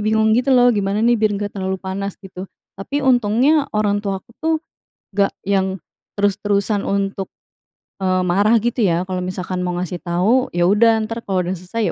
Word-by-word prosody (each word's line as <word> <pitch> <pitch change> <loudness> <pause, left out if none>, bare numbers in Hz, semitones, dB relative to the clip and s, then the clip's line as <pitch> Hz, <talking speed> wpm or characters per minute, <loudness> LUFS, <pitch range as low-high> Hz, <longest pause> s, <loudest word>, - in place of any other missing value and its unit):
bingung 220 +1 +2
gitu, 250 +4 +3
lo, 245 0 +5
gimana 205 0 0
nih 235 -1 +3
biar 215 -1 +2
nggak 205 0 -4
terlalu 190 0 -2
panas, 195 +1 -4
gitu. 190 0 -8 0.3
Tapi, 280 +9 -3
untungnya, 260 +4 +3
orang 205 -1 +1
tuaku 195 +1 -4
tuh, 320 0 +1 0.6
nggak 200 -1 +2 0.2
yang 190 -2 0 0.3
terus-terusan 205 0 0
untuk, 195 -1 -2 0.7
eee, 185 -1 +1
marah 200 +5 +3
gitu, 240 +1 -1
ya. 170 -1 +1
Kalau 185 -1 -3
misalkan 185 0 -4
mau 180 - -2
ngasih 180 0 -3
tahu, 195 +9 +1
ya 175 0 +2
udah, 220 +4 +4
ntar 225 +2 -5
kalau 190 -2 0
udah 180 - -2
selesai, 205 +5 -2
200 Hz, 170 wpm, -19 LUFS, 190-225 Hz, 0.7 s, lo